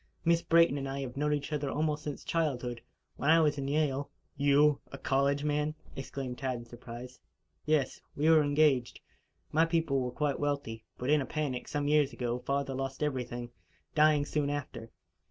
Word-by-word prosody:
Miss 170 0 +4
Brayton 165 -4 +4
and 135 0 -4
I 135 +1 -3
have 130 -2 -6
known 150 +2 0
each 145 +1 -2
other 145 -2 -1
almost 150 0 0
since 145 -2 -5
childhood. 125 -8 -1 0.4
When 145 - 0
I 165 +1 +7
was 150 -2 +2
in 135 - -3
Yale 145 -1 0 0.2
" - - -44
"You 145 +1 +5
a 140 - -7
college 140 +1 +1
man!" 150 +1 0 0.2
exclaimed 135 -2 -5
Tad 130 -2 -1
in 120 - -9
surprise. 120 +1 -10 0.5
"Yes. 150 -4 +1
We 150 +2 +1
were 160 -1 +7
engaged. 145 -4 +2 0.5
My 160 +2 +4
people 165 -5 +1
were 125 -1 -1
quite 140 +2 -1
wealthy; 140 -6 -2
but, 125 +3 -1
in 150 -1 +4
a - - -2
panic, 140 -5 -3
some 145 -1 -2
years 150 -2 +3
ago, 120 0 -2
father 140 +1 -1
lost 135 +1 -3
everything, 125 -4 -3 0.4
dying 150 -1 +4
soon 145 -1 -1
after. 135 -5 -5
140 Hz, 185 wpm, -31 LUFS, 130-150 Hz, 0.5 s, I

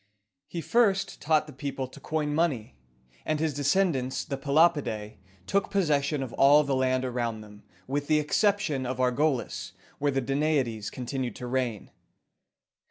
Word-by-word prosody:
He 170 - -5
first 205 -2 +1
taught 155 0 +2
the 150 - -11
people 135 0 -4
to - - -14
coin 150 -2 -2
money; 145 - 0 0.5
and 155 -1 -1
his 155 -1 0
descendants, 140 -2 +1
the 140 - -3
Pe 135 +1 -9
lop´i 160 +1 +5
dæ, 105 -4 -6 0.3
took 200 - 0
possession 150 -6 +1
of 125 - -7
all 145 +2 +6
the 140 -2 0
land 130 0 +1
around 120 -3 -2
them, 105 -1 -13 0.2
with 145 +2 -2
the 155 - +4
exception 150 - +1
of 130 0 -3
Argolis, 130 +1 0 0.3
where 145 - +1
the 135 - 0
Da 135 +1 -2
na´i 150 0 +2
des 110 -2 -5
continued 125 -1 -4
to 125 - -7
reign. 125 -4 -2
140 Hz, 165 wpm, -27 LUFS, 125-155 Hz, 0.5 s, all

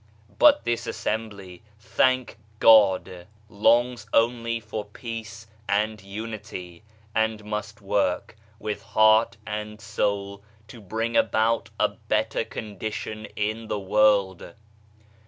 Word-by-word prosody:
But 295 -1 +6
this 120 0 -1
assembly, 100 -5 -4 0.2
thank 120 +3 +1 0.2
God, 95 -5 +5 0.2
longs 120 +4 +2
only 115 0 +2
for 110 -1 -5
peace 110 +1 -8 0.2
and 105 +1 0
unity, 100 -4 -7 0.3
and 110 -1 0
must 105 +1 -5
work 100 -1 -1 0.2
with 105 -1 -4
heart 110 +1 +4
and 105 0 -5
soul 100 -2 -2 0.3
t'o 120 - -12
bring 110 +3 -3
about 110 +1 +2
a - - +3
better - - -1
condition 110 +1 -6
in 110 +2 -2
the 105 - -2
world. 100 -3 +2
110 Hz, 105 wpm, -25 LUFS, 100-115 Hz, 0.3 s, But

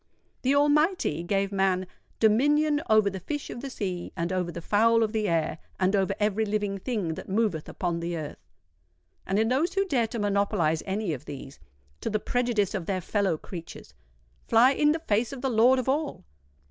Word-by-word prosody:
The 265 +2 +2
Almighty 295 - +2
gave 195 +3 0
man 190 -1 +1 0.3
"dominion 290 +7 +3
over 215 -1 +5
the 195 -1 -2
fish 290 - -5
of 240 - -7
the 275 - -5
sea, 185 -8 -4
and 170 +2 -1
over 180 -2 -1
the 170 - -6
fowl 230 +6 +3
of 215 - -1
the 215 -2 0
air, 165 -1 0 0.2
and 190 +2 +2
over 195 0 +1
every 210 +1 +1
living 205 -2 -1
thing 200 -7 -2
that - - -9
moveth 195 -6 0
upon 175 -2 -2
the 170 0 -3
earth;" 150 - -6 0.9
and 190 - 0
those 300 +9 +1
who 390 0 +2
dare 250 -11 +1
to 235 - -6
monopolise 200 -6 +1
any 195 -2 -1
of 145 +1 -7
these, 140 -1 -9 0.4
to - - -3
the 215 0 0
prejudice 235 -4 0
of 185 -5 -4
their 190 -2 0
fellow 190 -2 0
creatures, 170 0 -10 0.5
fly 235 +4 +6
in 295 +2 +3
the 315 - +1
face 230 -8 0
of 270 -2 -7
the 265 -1 0
Lord 240 +4 +5
of 255 - -2
all! 285 - -1
205 Hz, 190 wpm, -27 LUFS, 185-250 Hz, 0.9 s, fly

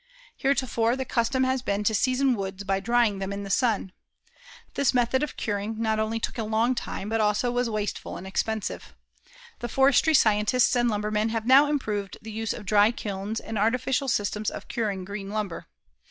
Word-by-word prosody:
Heretofore, 245 -4 +1
the 265 0 -3
custom 255 +2 +1
has 260 0 +1
been 205 -3 -1
to 220 - +2
season 255 +4 +2
woods 195 -1 -5
by 195 -1 0
drying 230 -2 +2
them 195 0 -3
in 200 0 -4
the 195 - -5
sun. 220 -5 +1 0.8
This 280 -2 +1
method 245 +2 +2
of 300 - -3
curing 210 0 -3
not 220 -1 0
only 220 +1 -1
took 230 - -4
a - - 0
long 220 +3 +1
time 210 -4 -5
but 225 +1 0
also 210 +3 +1
was 245 0 0
wasteful 210 -2 -3
and 185 - -9
expensive. 215 +2 -3 0.6
The 240 - -4
forestry 275 +5 +4
scientists 220 +1 +3
and 240 -1 +2
lumbermen 210 +1 0
have 225 -1 -2
now 270 +4 +7
improved 210 -9 -2
the 220 - -9
use 220 +1 -3
of 210 - -6
dry 205 +2 +5
kilns 210 -1 -4
and 220 -2 -5
artificial 250 +5 +1
systems 210 -2 0
of - - -9
curing 200 -5 -2
green 200 0 -6
lumber. 205 -4 -4
220 Hz, 185 wpm, -26 LUFS, 205-245 Hz, 0.8 s, now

